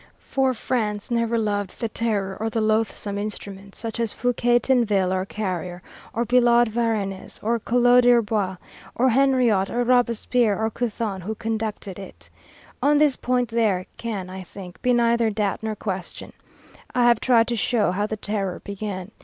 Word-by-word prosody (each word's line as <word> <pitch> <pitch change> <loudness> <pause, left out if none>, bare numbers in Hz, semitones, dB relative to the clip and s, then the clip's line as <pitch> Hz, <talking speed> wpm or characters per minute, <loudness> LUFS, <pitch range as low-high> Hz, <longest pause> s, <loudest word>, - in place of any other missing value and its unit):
For 265 -1 0
France 215 -2 -2
never 230 0 +1
loved 205 -3 -2
the 230 - -1
Terror 205 -4 -2
or 220 +1 -1
the 225 - -2
loathsome 215 -2 0
instruments, 200 -1 -7
such 225 0 -5
as 230 -2 0
Fouquier 245 0 +2
Tinville, 210 -8 +2
or 185 0 -1
Carrier, 180 -4 -4 0.3
or 235 +2 -1
Billaud 240 -1 +4
Varennes, 215 -4 -2
or 230 +2 +1
Collot 245 +2 +4
d'Herbois, 215 -6 +2 0.4
or 260 +2 +3
Henriot, 245 -6 +3
or 245 +1 0
Robespierre, 240 -2 +2
or 220 0 0
Couthon, 220 -5 -3
who 215 +5 -4
conducted 215 -4 -4
it. 85 - -12 0.5
On 290 +3 +4
this 295 -3 +4
point 245 -1 0
there 215 -6 +1
can, 210 -6 -4
I 185 +1 -7
think, 180 0 -11
be 250 - +2
neither 235 -1 +3
doubt 210 -2 -1
nor 220 -1 -3
question. 190 -4 -6 0.6
I 250 - +3
have 240 -2 +5
tried 235 -3 +3
to 240 - 0
show 220 -3 +1
how 205 +3 -1
the 220 - -4
Terror 200 -3 -3
began. 200 -1 -5
220 Hz, 160 wpm, -23 LUFS, 200-240 Hz, 0.6 s, have